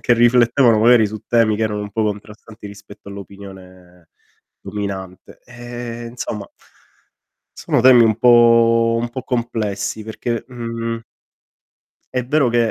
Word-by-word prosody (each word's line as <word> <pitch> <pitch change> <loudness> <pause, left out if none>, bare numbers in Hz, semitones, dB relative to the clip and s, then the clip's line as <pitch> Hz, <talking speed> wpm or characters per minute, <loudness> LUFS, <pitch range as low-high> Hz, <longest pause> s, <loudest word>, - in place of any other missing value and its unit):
che 120 - +2
riflettevano 120 0 +3
magari 115 0 +5
su 110 +1 -7
temi 115 -3 +2
che 110 - -3
erano 105 -1 -3
un 105 - -7
po' 110 - -2
contrastanti 105 +1 -7
rispetto 100 0 -13
all'opinione 95 -3 -13 0.5
dominante. 95 -3 -7
Ehm, 120 -1 -8
insomma 105 -4 -6 1.1
sono - - 0
temi 125 -1 +6
un 110 -1 +2
po' 115 -1 +4
un 120 - -3
po' 130 +2 -6
complessi 110 -4 -3
perché, 115 +1 -4
mhmm 115 -2 -5 1.1
è 125 -1 -1
vero 140 -1 +2
che, 115 -1 +1
115 Hz, 130 wpm, -19 LUFS, 105-120 Hz, 1.1 s, temi